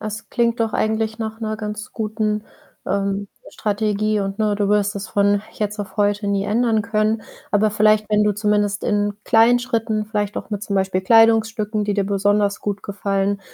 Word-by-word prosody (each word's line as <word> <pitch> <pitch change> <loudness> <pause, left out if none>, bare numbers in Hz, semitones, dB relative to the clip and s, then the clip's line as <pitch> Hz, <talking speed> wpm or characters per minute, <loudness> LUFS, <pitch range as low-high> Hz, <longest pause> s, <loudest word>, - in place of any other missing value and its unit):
Das 215 +1 -6
klingt 235 -1 0
doch 225 -1 0
eigentlich 220 +1 -1
nach 220 0 -5
'ner 215 -1 -2
ganz 215 +2 -6
guten, 215 -1 -2 0.4
ähm, 200 0 -1 0.2
Strategie. 215 0 0
Und, 195 +1 -4
ne, 215 -1 +1
du 205 -1 0
wirst 205 0 +1
es 195 - -5
von 205 -1 +2
jetzt 210 0 -3
auf 200 -2 -6
heute 205 0 +1
nie 200 -1 0
ändern 220 +1 +1
können. 215 +1 0 0.3
Aber 210 +1 +3
vielleicht, 215 0 +3
wenn 210 0 +3
du 210 - +2
zumindest 205 -1 0
in 205 -1 +1
kleinen 230 +2 +5
Schritten 225 -3 -1
vielleicht 210 -1 -2
auch - - -9
mit, 205 -1 -3
zum 200 - -3
Beispiel 190 -1 0
Kleidungsstücken, 220 0 +3
die 205 - 0
dir 200 - +1
besonders 205 +1 +1
gut 205 -1 -3
gefallen, 200 0 -1
210 Hz, 180 wpm, -21 LUFS, 205-220 Hz, 0.4 s, kleinen